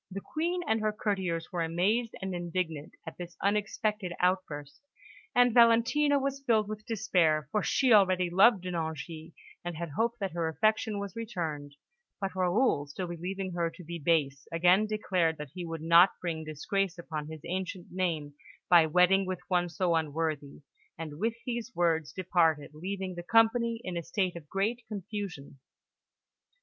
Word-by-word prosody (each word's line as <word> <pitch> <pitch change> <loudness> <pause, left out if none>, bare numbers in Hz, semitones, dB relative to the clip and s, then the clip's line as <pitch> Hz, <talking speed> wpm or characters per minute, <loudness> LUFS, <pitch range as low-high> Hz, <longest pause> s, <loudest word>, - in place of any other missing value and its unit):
The 195 +1 -5
Queen 345 - -2
and 220 0 +1
her 215 0 +1
Courtiers 190 -6 -2
were 175 -2 -2
amazed 195 +8 0
and 190 -1 -3
indignant 170 -3 -3
at - - -9
this 175 -1 -8
unexpected 205 -1 -1
outburst, 175 -6 -1 0.5
and 245 -1 +5
Valentina 240 +5 +5
was 275 0 -2
filled 220 -5 +2
with 215 +1 -7
despair, 175 - +2
for 210 - +1
she 255 +2 +3
already 185 -3 +5
loved 190 +4 +5
De 180 - -4
Nangis, 160 -1 -5 0.3
and 175 -2 -5
had 170 0 -4
hoped 230 +9 0
that 195 -3 -2
her 170 -1 -1
affection 215 +5 +1
was 200 -2 -5
returned; 160 -11 -4 0.4
but 195 -2 -3
Raoul, 185 - +2
still 165 +6 -5
believing 185 +3 -4
her 170 -1 0
to 180 - -13
be 170 +1 -6
base, 145 -4 +1
again 180 +5 +4
declared 185 -6 0
that 150 -3 -8
he 180 -2 -6
would 165 -1 -5
not 170 +3 +6
bring 165 -3 -3
disgrace 180 +5 -2
upon 155 -3 -5
his 160 -1 -8
ancient 185 0 -4
name 165 -6 -2 0.4
by 170 -2 +7
wedding 180 +4 +4
with 185 -1 -3
one 175 -1 +1
so 175 +1 0
unworthy, 155 -2 -2 0.3
and 155 -2 -7
with 225 +3 0
these 240 0 -4
words 165 -3 +1
departed, 170 -6 +1
leaving 185 +3 -4
the 175 - -6
company 230 +3 +3
in 185 -1 -4
a 170 - -1
state 185 +1 -1
of 155 -4 -10
great 215 +5 -1
confusion. 195 -9 -6
180 Hz, 165 wpm, -30 LUFS, 165-210 Hz, 0.5 s, by